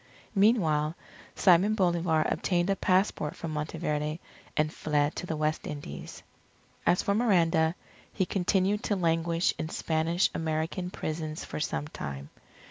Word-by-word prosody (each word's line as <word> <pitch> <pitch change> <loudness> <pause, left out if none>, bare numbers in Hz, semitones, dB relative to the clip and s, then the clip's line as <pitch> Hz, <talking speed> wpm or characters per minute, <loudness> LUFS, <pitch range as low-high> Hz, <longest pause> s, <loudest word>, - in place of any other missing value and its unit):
Meanwhile, 170 -8 +3 0.4
Simon 190 +3 +5
Bolivar 170 -5 +2
obtained 175 +1 +1
a - - +2
passport 185 -5 +1
from 165 - -5
Monteverde 150 0 -2 0.4
and 155 +1 +1
fled 150 -1 0
to 180 - -4
the 160 - -2
West 155 +1 -1
Indies. 145 - -7 0.6
As 180 - +4
for 200 - +1
Miranda, 170 -7 +3 0.4
he 190 - 0
continued 195 +2 +1
to 205 - +1
languish 165 -1 +1
in 155 - -3
Spanish 165 +2 +1
American 160 +3 -2
prisons 155 -2 -4
for - - -5
some 150 -1 -2
time. 70 - -7
165 Hz, 130 wpm, -29 LUFS, 155-185 Hz, 0.6 s, Simon